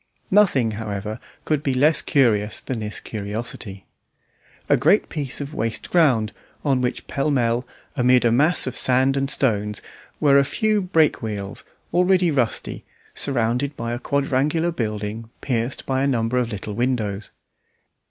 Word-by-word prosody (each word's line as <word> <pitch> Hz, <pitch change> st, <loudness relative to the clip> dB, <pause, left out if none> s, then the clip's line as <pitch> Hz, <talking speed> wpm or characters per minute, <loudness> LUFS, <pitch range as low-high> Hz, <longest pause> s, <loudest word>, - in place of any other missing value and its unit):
Nothing, 175 Hz, -, +4 dB
however, 105 Hz, 0 st, -5 dB, 0.3 s
could 155 Hz, -2 st, 0 dB
be 135 Hz, -3 st, -1 dB
less 150 Hz, +4 st, +3 dB
curious 110 Hz, -8 st, +2 dB
than 125 Hz, -3 st, -4 dB
this 105 Hz, -1 st, -4 dB
curiosity. 105 Hz, -2 st, -6 dB, 0.8 s
A -, -, +5 dB
great 165 Hz, -, +3 dB
piece 140 Hz, -5 st, 0 dB
of 140 Hz, +1 st, -6 dB
waste 115 Hz, -1 st, -3 dB
ground, 130 Hz, -11 st, +3 dB, 0.3 s
on 135 Hz, -3 st, +2 dB
which 125 Hz, -, -2 dB
pell 140 Hz, +2 st, -1 dB
mell, 120 Hz, -2 st, +1 dB, 0.3 s
amid 125 Hz, 0 st, +4 dB
a 115 Hz, -, +4 dB
mass 150 Hz, +9 st, +4 dB
of 130 Hz, -1 st, -4 dB
sand 130 Hz, +1 st, +3 dB
and 135 Hz, 0 st, -1 dB
stones, 105 Hz, -7 st, 0 dB, 0.4 s
were 140 Hz, -2 st, +5 dB
a -, -, +4 dB
few 215 Hz, +8 st, 0 dB
break 165 Hz, -5 st, +2 dB
wheels, 105 Hz, -3 st, -5 dB, 0.3 s
already 180 Hz, -1 st, +3 dB
rusty, 125 Hz, -6 st, -1 dB, 0.3 s
surrounded 130 Hz, +2 st, -1 dB
by 115 Hz, 0 st, -3 dB
a 120 Hz, -, -3 dB
quadrangular 140 Hz, +5 st, 0 dB
building 110 Hz, -4 st, -4 dB
pierced 125 Hz, -1 st, -2 dB
by 130 Hz, 0 st, 0 dB
a 140 Hz, -, +2 dB
number 120 Hz, -1 st, +1 dB
of 120 Hz, -1 st, -2 dB
little 105 Hz, 0 st, -5 dB
windows. 110 Hz, -4 st, -2 dB
125 Hz, 150 wpm, -22 LUFS, 110-140 Hz, 0.8 s, A